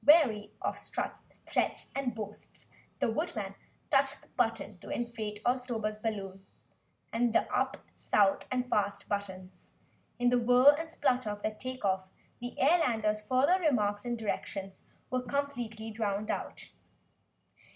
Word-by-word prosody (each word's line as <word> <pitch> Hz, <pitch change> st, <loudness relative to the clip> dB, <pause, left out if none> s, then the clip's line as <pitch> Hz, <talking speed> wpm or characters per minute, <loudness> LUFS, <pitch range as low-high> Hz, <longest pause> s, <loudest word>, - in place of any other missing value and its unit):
Weary 255 Hz, -9 st, +6 dB
of -, -, -1 dB
Strut's -, -, -4 dB, 0.3 s
threats -, -, 0 dB
and 260 Hz, -4 st, -1 dB
boasts, 210 Hz, -1 st, -8 dB, 0.3 s
the -, -, +1 dB
Woodman 225 Hz, -, -2 dB, 0.4 s
touched 275 Hz, -1 st, +2 dB
the -, -, -21 dB
button 225 Hz, -5 st, -1 dB
to -, -, -11 dB
inflate 220 Hz, -3 st, -3 dB
the 245 Hz, -, +6 dB
Oztober's 230 Hz, -4 st, -3 dB
balloon, 195 Hz, -3 st, -4 dB, 0.7 s
and 235 Hz, 0 st, +2 dB
the -, -, +3 dB
"up," -, -, +1 dB, 0.2 s
"south" 195 Hz, -2 st, +2 dB
and 250 Hz, -1 st, 0 dB
"fast" 200 Hz, -3 st, 0 dB
buttons. 190 Hz, -2 st, -5 dB, 0.4 s
In 245 Hz, 0 st, +3 dB
the 245 Hz, 0 st, +4 dB
whirr 250 Hz, +4 st, +7 dB
and 325 Hz, +2 st, -4 dB
splutter 250 Hz, -7 st, +1 dB
of 205 Hz, 0 st, -5 dB
their 215 Hz, -, 0 dB
take 255 Hz, +2 st, -5 dB
off, 190 Hz, -1 st, +1 dB, 0.3 s
the 245 Hz, 0 st, -6 dB
Airlander's 230 Hz, -9 st, +3 dB
further 265 Hz, -, +4 dB
remarks 210 Hz, -, +2 dB
and 240 Hz, -1 st, -2 dB
directions 195 Hz, -3 st, -4 dB, 0.3 s
were 255 Hz, 0 st, +1 dB
completely 240 Hz, -4 st, -3 dB
drowned 210 Hz, -1 st, -1 dB
out. -, -, -5 dB
225 Hz, 140 wpm, -31 LUFS, 210-255 Hz, 0.7 s, whirr